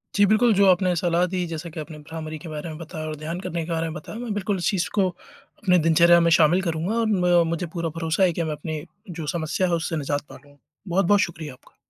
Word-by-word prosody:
जी, 205 - +5
बिल्कुल 215 +3 +4
जो 200 +1 +5
आपने 180 0 +3
सलाह 175 +1 +1
दी 180 -1 0
जैसे 165 +1 -6
कि 165 - -7
आपने 155 0 -7
भ्रामरी 155 +1 -7
के 165 - -9
बारे 155 +1 -5
में 155 - -7
बताया 160 -1 -7
और 155 - -4
ध्यान 155 +4 -5
करने 170 -3 -3
के 170 - -6
बारे 165 0 -1
में - - -6
बताया। 175 +5 -8
मैं 240 -3 -3
बिल्कुल 205 0 -1
इस 180 - 0
चीज़ 195 -5 0
को 195 -3 +3
अपने 180 +1 -2
दिनचर्या 170 +1 +5
में 170 0 +3
शामिल 165 +4 +4
करूँगा 170 +3 -2
और 230 - +1
म 180 -4 +3
मुझे 170 +2 -2
पूरा 170 -1 -2
भरोसा 165 +3 0
है 180 -2 +3
कि 170 - -2
मैं 160 - -2
अपनी 150 0 -5 0.3
जो 165 -3 -6
समस्या 165 +3 -1
है 175 - -1
उससे 165 0 -1
निजात 145 -1 -1
पा - - -11
लूँगा। 145 +1 -18 0.3
बहुत-बहुत 195 +3 +3
शुक्रिया 155 -5 -4
आपका। 130 - -22
170 Hz, 250 wpm, -24 LUFS, 155-185 Hz, 0.3 s, जी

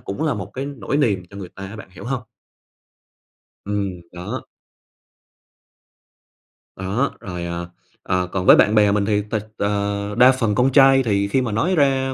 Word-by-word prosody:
cũng 100 +9 -5
là 155 - +1
một 100 -2 -6
cái 135 +2 -4
nỗi 140 -2 -3
niềm 105 -11 +1
cho 100 - -11
người 95 -3 -7
ta 100 +2 -9
á, 105 +3 -9
bạn 110 - -11
hiểu 95 - -12
hông? 130 0 -3 1.4
Ừm, 100 -3 -3
đó. 90 0 -6 2.3
Đó, 100 +9 -1
rồi, 90 -3 -6
ờ, 85 0 -5 0.3
ờ, 90 0 0
còn 95 -1 -2
với - - +9
bạn 105 - +4
bè 105 -1 +5
mình 100 0 +1
thì 105 0 +1
thật 110 -1 -2
ờ, 100 0 -2
đa 125 +2 +8
phần 115 -5 0
con 125 +4 +3
trai 135 0 +6
thì 100 -4 +1
khi 130 +6 +1
mà 120 -3 -2
nói 165 - +1
ra 135 -3 +2
105 Hz, 180 wpm, -21 LUFS, 100-130 Hz, 2.3 s, với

